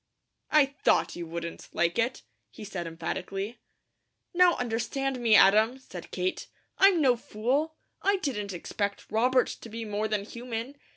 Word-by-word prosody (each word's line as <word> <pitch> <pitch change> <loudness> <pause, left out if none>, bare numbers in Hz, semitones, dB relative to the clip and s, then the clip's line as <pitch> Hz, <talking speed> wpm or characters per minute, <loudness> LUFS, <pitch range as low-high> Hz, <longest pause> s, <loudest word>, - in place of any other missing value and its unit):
"I 305 -2 +6 0.2
THOUGHT - - +3
you 170 -1 -6
wouldn't 170 0 -6
like 170 +4 +1
it," 235 - 0 0.3
he 210 - -11
said 190 -4 -5
emphatically. 195 +6 -4 0.7
"Now 355 -1 +5
understand 250 +3 -2
me, 230 -3 +4
Adam," 215 +6 +6
said 185 -10 -10
Kate. 185 0 -2 0.3
"I'm 385 -4 +6
no 255 -3 +5
fool. 260 +8 -1 0.3
I 400 0 +2
didn't 215 - -3
expect 200 +3 -4
Robert 250 +3 +3
to 230 - -8
be 225 +1 -6
more 210 +1 -1
than 210 -2 -1
human. 235 +2 -5
225 Hz, 150 wpm, -28 LUFS, 200-260 Hz, 0.7 s, I